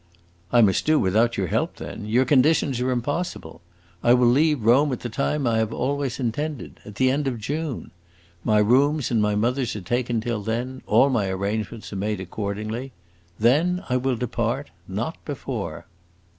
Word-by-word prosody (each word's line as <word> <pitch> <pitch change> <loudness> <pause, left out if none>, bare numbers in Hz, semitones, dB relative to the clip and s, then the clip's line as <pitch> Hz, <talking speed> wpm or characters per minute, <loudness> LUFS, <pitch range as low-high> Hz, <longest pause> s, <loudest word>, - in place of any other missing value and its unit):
"I 120 - +6
must 100 +3 +3
do 155 0 +4
without 110 +5 +2
your 95 - 0
help 85 - -1
then! 105 - -7
Your 120 +5 +3
conditions 135 -1 +3
are 125 - 0
impossible. 125 - -3 0.4
I 120 +1 +5
will 125 0 +3
leave 145 +1 +3
Rome 135 +5 +5
at 125 - -3
the 120 - -4
time 140 +4 -1
I 115 -2 +2
have 110 -1 0
always 140 -1 -2
intended 140 +4 -3
at 105 - -11
the 130 +3 +3
end 140 +1 0
of 125 -3 -1
June. 145 +4 -4 0.5
My 110 - +3
rooms 130 +7 +3
and 115 -2 +2
my 105 0 +1
mother's 120 +3 0
are 105 - -5
taken 120 +4 -1
till 115 -1 -2
then; 120 +5 -3
all 140 - +4
my 105 -6 +1
arrangements 105 +3 -3
are - - -4
made 105 +1 -2
accordingly. 110 +6 -4 0.5
Then, 160 - +3
I 125 - +2
will 130 0 0
depart; 125 0 -2 0.2
not - - -4
before." - - -5
120 Hz, 175 wpm, -24 LUFS, 110-135 Hz, 0.5 s, I